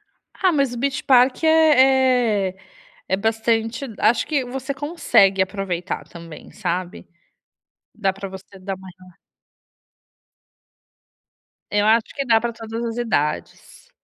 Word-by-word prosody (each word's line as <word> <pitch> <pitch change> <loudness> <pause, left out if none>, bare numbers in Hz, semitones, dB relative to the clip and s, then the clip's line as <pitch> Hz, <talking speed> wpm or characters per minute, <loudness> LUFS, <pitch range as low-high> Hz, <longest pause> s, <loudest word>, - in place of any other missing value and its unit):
Ah 380 - -2
ah, - - +2
mas 275 -5 +1
o - - -6
Beach 275 +2 -2
Park 255 +2 +4
é 260 -9 +4
é 185 - -12 0.5
é 190 - +1
bastante 225 +3 -1
acho 235 - +2
que 290 -4 0
você 265 +2 -5
consegue 255 - +2
aproveitar 190 -2 -3
também, 170 -2 -12
sabe. 180 0 -4 0.9
Dá 195 -3 0
para 195 0 -7
você 190 +1 -12
dar 195 +1 -5
uma 190 0 -13
rela 185 0 -17 2.6
Eu 205 0 +1
acho 220 +1 +3
que 275 - -2
dá 225 -2 +4
para 235 +1 -3
todas 225 +1 -6
as 230 -1 -4
idades. 150 -11 -3
225 Hz, 135 wpm, -21 LUFS, 195-260 Hz, 2.6 s, Park